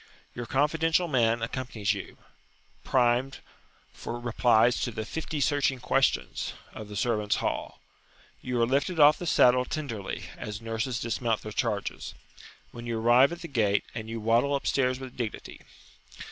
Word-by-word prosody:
Your 120 -1 -6
confidential 160 +6 +2
man 120 -5 +2
accompanies 115 -3 -2
you, - - -8 0.7
primed 125 +2 +2 0.6
for 120 - -6
replies 120 0 +3
to - - 0
the 110 -2 -5
"fifty 160 +3 -4
searching 140 -2 +1
questions" 135 +2 0 0.2
of 110 - -8
the 105 - -9
"servants' 105 -1 0
hall." - - -3 0.6
You 125 -1 -2
are - - +5
lifted 140 +7 0
off 150 +1 +7
the 175 - -5
saddle 125 -4 +5
tenderly, 125 -9 -5
as 105 -1 -6
nurses 115 +2 -3
dismount 115 0 -1
their 110 - -6
charges, 105 - -3 0.6
when 120 0 -9
you 115 -1 -2
arrive 120 +5 +5
at 170 - -7
the 170 - -6
gate; 105 -8 +1
and 110 -1 -6
you 115 0 -4
waddle 115 +6 +2
upstairs 130 -2 0
with 130 -2 -9
dignity. 115 -4 -6
120 Hz, 150 wpm, -28 LUFS, 115-135 Hz, 0.7 s, off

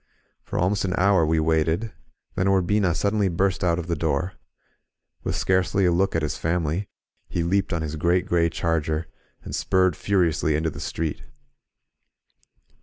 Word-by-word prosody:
For - - -6
almost 95 +3 +1
an 95 -1 -1
hour 95 -3 +4
we 80 0 +2
waited, 80 +6 +1 0.4
then 95 - 0
Ur 95 -1 +3
bina 95 -2 +1
suddenly 100 +2 +1
burst 95 +2 0
out 85 -2 +2
of 85 - -4
the 85 -1 -1
door. 80 +3 -1 0.9
With - - -2
scarcely 95 +1 +1
a 90 - +4
look 95 +2 +1
at 80 - 0
his 75 - -2
family, 85 +3 -1 0.4
he 85 -2 -1
leaped 95 +3 0
on 85 -2 -1
his 80 0 -4
great, 85 +3 +2
gray 85 -1 +2
charger, 80 -1 -1 0.4
and - - -8
spurred 95 -3 +2
furiously 85 -6 +1
into 80 +1 0
the - - -9
street. 80 -2 -3
85 Hz, 165 wpm, -24 LUFS, 80-95 Hz, 0.9 s, hour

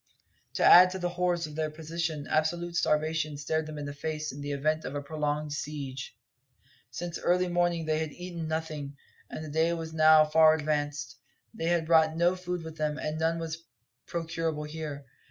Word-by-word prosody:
To - - +1
add 180 +1 +9
to 185 - -5
the 175 -1 -1
horrors 175 -1 0
of 150 - -9
their 155 0 -1
position, 160 -1 -4
absolute 170 +3 0
starvation 155 -2 0
stared 155 +2 -1
them 155 -1 -7
in 145 - -5
the 145 - -5
face 155 +1 -4
in 145 - -8
the 145 0 -4
event 155 +3 0
of 140 - -5
a 145 - -2
prolonged 150 0 -2
siege. 140 -3 -5 0.7
Since 170 +7 -5
early 180 +1 +2
morning 175 -1 +1
they 155 0 +1
had 160 -1 -3
eaten 175 -1 -6
nothing, 155 -3 -4 0.3
and 155 - -6
the 150 - -7
day 160 +2 +2
was 165 -1 -5
now 155 -1 +7
far 155 +1 +6
advanced; 145 -3 -2 0.4
they 195 -8 -4
had 170 -1 +2
brought 160 -1 +4
no 175 +2 +3
food 180 -1 -4
with 160 0 -9
them, 150 -1 -1
and 155 0 -3
none 165 +1 +1
was 165 0 -5 0.4
procurable 165 -2 -2
here. 150 -2 -6
160 Hz, 190 wpm, -29 LUFS, 150-165 Hz, 0.7 s, add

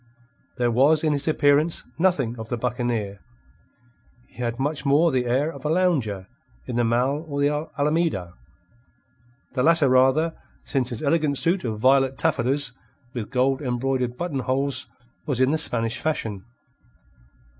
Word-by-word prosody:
There 120 -1 +1
was 145 +6 +3
in 155 -1 +2
his 140 +1 -2
appearance 150 +1 +2
nothing 150 -10 +1
of 110 0 -7
the 120 - -2
buccaneer. 115 -4 -2 1.1
He - - -24
had 120 -1 -3
much 145 +3 -2
more 150 +4 +3
the 125 -2 0
air 135 +6 +1
of 140 - -11
a 150 - -1
lounger 140 - 0 0.4
in 120 - -4
the 120 - +2
Mall 125 +6 +1
or 140 -2 -4
the 150 +2 0
Alameda 150 - 0 1.2
the 130 - 0
latter 160 0 +4
rather, 130 +6 +3 0.3
since 130 -3 -1
his 120 0 -5
elegant 150 -1 +1
suit 175 +6 +3
of 110 -3 -3
violet 135 +2 +3
taffetas 135 -3 +1 0.4
with 115 -4 -5
gold 130 +2 +1
embroidered 125 -1 -1
button 170 -6 -3
holes 130 -1 -1 0.4
was 135 -5 -1
in 130 +1 +3
the 160 - +1
Spanish 115 -3 -1
fashion. 110 -11 -3
135 Hz, 150 wpm, -24 LUFS, 120-150 Hz, 1.2 s, latter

